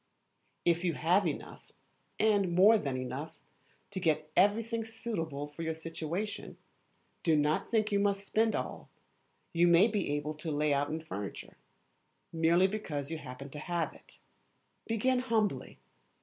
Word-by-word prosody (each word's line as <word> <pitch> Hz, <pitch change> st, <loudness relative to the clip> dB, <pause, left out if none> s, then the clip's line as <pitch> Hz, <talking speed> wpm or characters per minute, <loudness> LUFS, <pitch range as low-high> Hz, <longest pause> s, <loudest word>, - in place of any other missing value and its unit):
If 170 Hz, 0 st, +3 dB
you 170 Hz, -4 st, +1 dB
have 180 Hz, +4 st, +3 dB
enough, 150 Hz, -, -6 dB, 0.5 s
and 200 Hz, -5 st, +2 dB
more 210 Hz, +5 st, +7 dB
than 140 Hz, -6 st, -2 dB
enough, 130 Hz, +5 st, -5 dB, 0.5 s
to 195 Hz, -, -3 dB
get 155 Hz, -3 st, 0 dB
everything 225 Hz, +3 st, +3 dB
suitable 165 Hz, -11 st, -4 dB
to 150 Hz, +3 st, -9 dB
your 160 Hz, 0 st, -2 dB
situation, 165 Hz, +5 st, -5 dB, 0.6 s
do 165 Hz, -2 st, +3 dB
not 150 Hz, +1 st, +1 dB
think 215 Hz, -2 st, +1 dB
you 200 Hz, -, +3 dB
must 200 Hz, 0 st, +1 dB
spend 220 Hz, +2 st, +2 dB
all, -, -, -5 dB, 0.6 s
you 170 Hz, +1 st, +4 dB
may 170 Hz, +5 st, +6 dB
be 205 Hz, -7 st, -1 dB
able 150 Hz, +1 st, -3 dB
to 160 Hz, +1 st, -4 dB
lay 150 Hz, 0 st, +1 dB
out 140 Hz, +1 st, +1 dB
in 160 Hz, +1 st, -3 dB
furniture, 105 Hz, -11 st, -7 dB, 0.8 s
merely 165 Hz, +3 st, +4 dB
because 165 Hz, -8 st, -3 dB
you 160 Hz, -, -3 dB
happen 135 Hz, 0 st, -9 dB
to 150 Hz, -, -7 dB
have 170 Hz, +1 st, -2 dB
it. -, -, -17 dB, 0.7 s
Begin 250 Hz, +3 st, +2 dB
humbly. 225 Hz, -5 st, 0 dB
170 Hz, 150 wpm, -31 LUFS, 150-205 Hz, 0.8 s, more